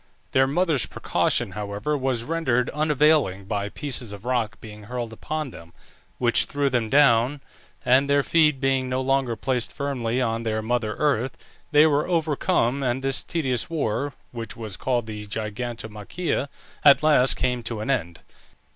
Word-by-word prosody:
Their 135 0 +4
mother's 155 -2 +1
precaution, - - 0
however, 105 +7 -3
was 130 -4 -1
rendered 130 -5 0
unavailing 150 -9 +2
by 100 0 -2
pieces 125 -4 -4
of 100 +2 -10
rock 120 -4 -1
being 105 -1 -11
hurled 120 0 -5
upon 155 +4 -4
them, 85 -4 -13 0.4
which 120 -2 +3
threw 145 -2 -1
them 120 -3 0
down, 135 0 +4 0.5
and 135 +3 +4
their 140 0 +3
feet 150 -4 +3
being 135 -1 +1
no 130 0 0
longer 130 -2 +1
placed 125 +2 -1
firmly 130 -4 -2
on 115 -2 0
their 110 -1 -2
mother 110 -2 -1
earth, 135 -4 0 0.3
they 150 0 +6
were 150 -1 +2
overcome, 155 -5 +1
and 130 0 -1
this 135 0 +3
tedious 130 -8 -2
war 145 -3 -2 0.2
(which 115 -3 -7
was 110 -4 -5
called 120 0 -1
the 105 -1 -7
Gigantomachia) 110 - -4 0.4
at 145 0 +7
last 145 -4 +4
came 125 -1 -1
to 115 -1 -5
an 135 - -1
end. 85 -10 -2
125 Hz, 155 wpm, -24 LUFS, 110-140 Hz, 0.5 s, at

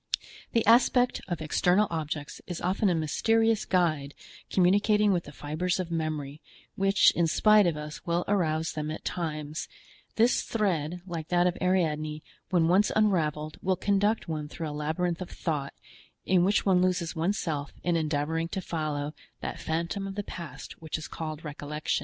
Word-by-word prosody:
The 230 -3 +2
aspect 245 +2 +4
of 175 -4 -3
external 180 +6 +3
objects 155 -2 -4
is 175 -2 -4
often 190 +3 +1
a 175 - +2
mysterious 225 +8 +2
guide 155 -6 +1 0.3
communicating 205 +3 +4
with 175 -2 -1
the 145 - -9
fibres 155 +6 -2
of 175 -2 -3
memory, 155 -3 -3 0.3
which 195 0 +4
in 170 -1 +1
spite 210 +4 +5
of 165 -3 0
us 150 0 -7
will 170 +1 0
arouse 165 -5 +1
them 155 0 -3
at 155 - -6
times; 155 -3 -3 0.5
this 230 +3 +4
thread, 175 -6 -1
like 165 -4 -5
that 175 0 +3
of 180 0 +2
Ariadne, 155 -5 0 0.3
when 170 -4 +3
once 190 +4 +4
unraveled 155 -8 +1
will 185 0 +1
conduct 205 +3 +1
one 155 -2 -3
through 160 +1 -5
a - - -5
labyrinth 160 +4 -2
of 180 - -5
thought, 145 -5 -3 0.5
in 180 -1 +4
which 200 +3 +2
one 185 -2 +4
loses 180 -2 0
one's 175 +6 0
self 145 -4 -3
in 175 -1 +1
endeavoring 160 +1 0
to 180 - -4
follow 150 -4 -3 0.3
that - - -4
phantom 170 +5 -2
of 195 - -6
the 205 - -2
past 170 -4 -9
which 160 -1 -3
is 155 - -7
called 155 0 -6
recollection. 150 +1 -2
170 Hz, 170 wpm, -28 LUFS, 155-190 Hz, 0.5 s, spite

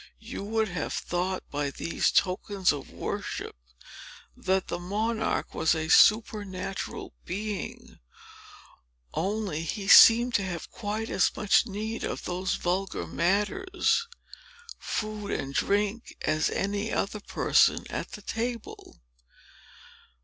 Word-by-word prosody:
You - - -7
would 220 +1 0
have 175 -3 -3
thought, 185 +2 -2
by 145 0 -1
these 165 - 0
tokens 185 -1 +1
of 140 -2 -7
worship, - - -5 0.8
that 190 0 0
the - - -3
monarch 220 +5 -1
was 160 - +2
a 160 0 -3
supernatural 205 -3 +2
being; 205 +1 -5 1.1
only 195 -4 -2
he 195 +4 -4
seemed 235 +4 +8
to 200 - +2
have 175 -4 -5
quite 220 +1 -4
as - - +3
much 210 +3 +3
need 215 +2 -4
of - - -3
those 180 +1 -1
vulgar 190 +2 -2
matters, 210 - +1 0.7
food 215 -1 -4
and 135 0 -3
drink, 205 - 0
as 155 0 +1
any 205 +2 -2
other 210 +2 -1
person - - +2
at - - -5
the - - -8
table. 235 0 -5
200 Hz, 115 wpm, -28 LUFS, 180-215 Hz, 1.1 s, seemed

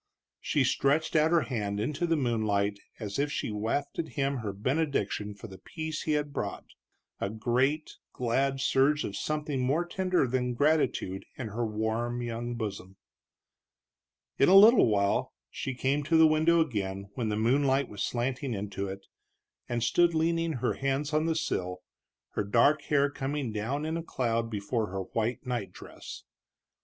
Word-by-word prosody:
She 145 - +1
stretched 140 +5 +1
out 155 0 +5
her 170 -1 +4
hand 105 -7 -2
into 150 +9 -1
the 165 - +2
moonlight 105 -6 0 0.2
as 105 0 -4
if 145 +1 0
she - - -2
wafted 140 +9 -2
him 140 0 +1
her 110 -4 -3
benediction 105 -3 -1
for 100 - -11
the 95 -4 -10
peace 160 - -5
he 155 - 0
had 150 -1 -1
brought, - - -4 0.5
a 100 - -1
great, 125 +8 0
glad 135 +3 0
surge 140 +2 +3
of 100 - -4
something 150 +1 -2
more 145 +7 +1
tender 185 -2 +1
than 125 -1 -1
gratitude 140 -9 +1
in 120 -4 -4
her 115 +3 -3
warm 115 +2 -2
young 120 +1 -4
bosom. 100 -4 -5 1.4
In 140 - +5
a 190 - +7
little 215 - +8
while 100 -2 +1 0.2
she 135 - -4
came 135 +3 0
to 165 +2 +3
the 160 - +8
window 160 +2 +4
again, 100 -8 -3
when 115 -2 -2
the 105 - -1
moonlight 135 +4 +2
was 100 -1 -8
slanting 125 +1 -1
into 100 0 -4
it, 95 0 -7 0.6
and 120 -1 -1
stood 170 +5 +3
leaning 165 0 +1
her 125 - -1
hands 140 +2 -1
on 155 +1 +2
the 165 - +1
sill, 90 - -2 0.5
her - - -1
dark 120 +9 +3
hair 140 -1 +3
coming 140 -3 -3
down 125 +8 -2
in 160 +1 -2
a - - -3
cloud 115 -6 -1 0.2
over 115 -3 +1
her 95 0 -4
white 115 +6 -2
night 120 -7 -3
dress. - - -10
130 Hz, 165 wpm, -29 LUFS, 110-150 Hz, 1.4 s, little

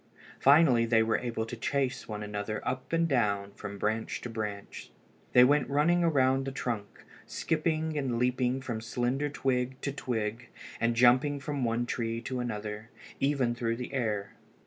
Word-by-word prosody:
Finally 140 -4 +6
they 115 -1 +4
were 110 0 +1
able 115 -2 -3
to 115 - -6
chase 135 +2 -1
one 105 -1 -5
another 105 +1 -4
up 130 0 -3
and 165 0 +2
down, 100 -8 +1
from 100 0 -8
branch 110 +2 -1
to 120 - -7
branch. 105 -3 -5 0.4
They 125 - +8
went 140 +1 +3
running 165 +5 +3
around 135 -4 +3
the 135 - -3
trunks, 115 -6 -4 0.2
skipping 160 -1 -1
and 135 -5 -1
leaping 125 +1 +1
from 120 -4 -4
slender 125 +5 -1
twig 130 -2 -1
to 140 - -2
twig, 115 -3 -3 0.3
and 115 0 +1
jumping 130 +4 +4
from 140 -1 -3
one 115 +1 0
tree 115 -1 -2
to 125 +2 -4
another, 105 -2 -4 0.3
even 135 -4 +1
through 115 -1 -1
the 125 +3 -6
air. 105 -6 -2
125 Hz, 165 wpm, -30 LUFS, 110-135 Hz, 0.4 s, They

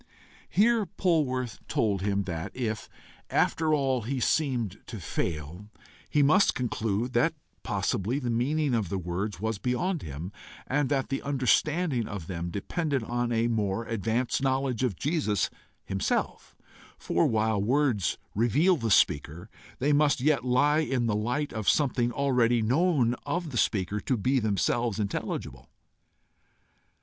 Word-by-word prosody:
Here 220 0 +3
Polwarth 130 - 0
told 100 -4 0
him 100 0 0
that, 85 -4 -4
if, 110 -4 -3 0.4
after 160 -1 +1
all, 135 -4 +1
he 130 +4 -3
seemed 120 - 0
to 110 - -7
fail, 85 +3 -4 0.4
he 150 - +3
must 170 +8 +4
conclude 115 -1 -1
that - - +2 0.3
possibly 110 +8 -1
the 125 -4 -2
meaning 140 +4 +1
of 110 -7 0
the 95 - -2
words 90 +4 -3
was 110 0 -2
beyond 150 - -1
him, 75 +6 -6 0.3
and 140 0 0
that 135 -2 0
the 135 - -2
understanding 140 0 +1
of 100 -5 -6
them 85 -1 -4
depended 140 - -2
on 120 +1 -2
a 115 0 +2
more 110 -1 -1
advanced 115 +4 -1
knowledge 130 -3 0
of 120 -7 0
Jesus 140 - 0 0.3
himself; 95 0 -2 0.4
for, - - +1
while 110 -2 +1
words 125 -3 +1 0.2
reveal 145 - +3
the 115 -4 -2
speaker, 85 +1 +2 0.3
they 145 +3 +1
must 145 -1 +3
yet 145 +2 +2
lie 145 +4 +3
in 135 -6 0
the 110 -3 +1
light 125 +8 -1
of 110 -3 0
something 125 -4 +2
already 120 -3 +2
known 130 0 +2
of 170 -3 -2
the - - -7
speaker 100 -1 0
to 125 +5 -1
be 130 +6 +2
themselves 110 +1 0
intelligible. 100 - -4
120 Hz, 140 wpm, -28 LUFS, 105-140 Hz, 0.4 s, must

